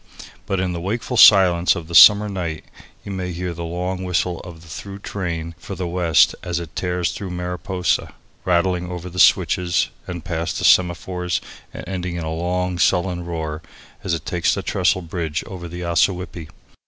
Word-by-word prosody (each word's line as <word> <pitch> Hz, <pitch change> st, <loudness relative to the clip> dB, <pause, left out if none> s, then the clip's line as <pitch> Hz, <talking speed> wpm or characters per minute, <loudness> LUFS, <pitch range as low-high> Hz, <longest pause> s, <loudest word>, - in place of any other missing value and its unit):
But 95 Hz, -, -1 dB
in 90 Hz, -1 st, -1 dB
the 85 Hz, -, -5 dB
wakeful 115 Hz, +7 st, -3 dB
silence 90 Hz, -6 st, +6 dB
of 80 Hz, -2 st, -6 dB
the 85 Hz, -, -9 dB
summer 105 Hz, +4 st, +8 dB
night 85 Hz, -6 st, -4 dB, 0.4 s
you 100 Hz, -, -6 dB
may 90 Hz, -1 st, -4 dB
hear 90 Hz, 0 st, -4 dB
the 85 Hz, 0 st, -6 dB
long 90 Hz, +2 st, -3 dB
whistle 90 Hz, -1 st, -1 dB
of 85 Hz, -2 st, -11 dB
the -, -, -16 dB
through 95 Hz, +6 st, -8 dB
train 85 Hz, -5 st, -4 dB
for -, -, -7 dB
the 90 Hz, -, -4 dB
west 85 Hz, -2 st, +3 dB
as 85 Hz, -1 st, -3 dB
it 85 Hz, -2 st, -9 dB
tears 90 Hz, -1 st, -1 dB
through 100 Hz, -, -6 dB
Mariposa, 90 Hz, 0 st, -2 dB, 0.3 s
rattling 90 Hz, 0 st, +1 dB
over 90 Hz, 0 st, -6 dB
the 90 Hz, -, -6 dB
switches 85 Hz, -2 st, +3 dB, 0.2 s
and 85 Hz, -3 st, -6 dB
past 85 Hz, -2 st, -3 dB
the -, -, -1 dB
semaphores 90 Hz, 0 st, +2 dB, 0.3 s
and -, -, -9 dB
ending 90 Hz, -2 st, -4 dB
in 85 Hz, -, -4 dB
a 80 Hz, 0 st, -3 dB
long, 90 Hz, +1 st, -2 dB
sullen 90 Hz, 0 st, +1 dB
roar 80 Hz, -2 st, -4 dB, 0.4 s
as 85 Hz, -, 0 dB
it 80 Hz, -, -8 dB
takes 85 Hz, -2 st, 0 dB
the -, -, -4 dB
trestle 95 Hz, -, +1 dB
bridge 80 Hz, -2 st, -3 dB
over 90 Hz, -3 st, -8 dB
the 90 Hz, +1 st, -7 dB
Ossawippi. 85 Hz, -1 st, 0 dB
90 Hz, 180 wpm, -21 LUFS, 85-90 Hz, 0.4 s, summer